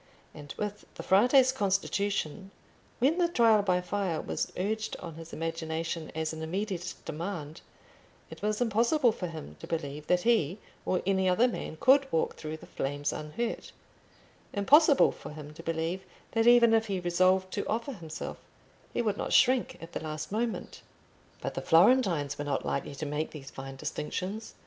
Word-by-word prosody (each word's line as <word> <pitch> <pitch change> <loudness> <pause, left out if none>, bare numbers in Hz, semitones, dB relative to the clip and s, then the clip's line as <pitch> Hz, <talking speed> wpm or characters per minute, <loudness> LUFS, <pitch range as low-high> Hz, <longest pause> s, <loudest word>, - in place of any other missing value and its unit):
And 145 -2 -10
with 210 0 -4
the - - -7
Frate's 250 +7 +5
constitution, 195 - -1 0.5
when 295 +8 +2
the 350 - +4
Trial 230 -9 +4
by 180 -3 +1
Fire 180 -3 -1
was - - -3
urged 215 +4 -2
on 170 -2 -8
his 165 +1 -10
imagination 165 0 -3
as 160 0 -2
an 160 - -6
immediate 185 +2 -3
demand, 160 -2 -5 0.7
it - - -10
was 210 0 0
impossible 240 +3 +3
for 185 -4 -4
him 155 - -9
to - - -9
believe 150 -2 -4
that 180 0 +2
he 210 -7 +2 0.3
or 185 - +1
any 190 -1 +2
other 225 +7 +4
man 195 -9 -5
could 270 +1 +5
walk 160 - 0
through 155 0 -6
the - - -13
flames 145 +1 -2
unhurt—impossible 235 - +1
for - - -10
him 150 -1 -9
to - - -10
believe 165 +3 -2 0.3
that 225 0 +2
even 240 -1 +7
if 225 0 +3
he 195 -2 -1
resolved 185 +2 +2
to 200 - -2
offer 235 +6 -1
himself, 165 -7 -7 0.6
he - - +1
would 210 -3 0
not - - -2
shrink 260 0 +4
at 165 - -9
the - - -4
last 155 0 -5
moment. 225 +2 -3 0.6
But - - -3
the - - -3
Florentines 170 - +4
were 145 - -2
not 145 - -1
likely - - -2
to 155 - -4
make 150 +2 -2
these 140 -3 -10
fine 135 0 -8
distinctions. 185 +10 -4
185 Hz, 170 wpm, -29 LUFS, 160-225 Hz, 0.7 s, even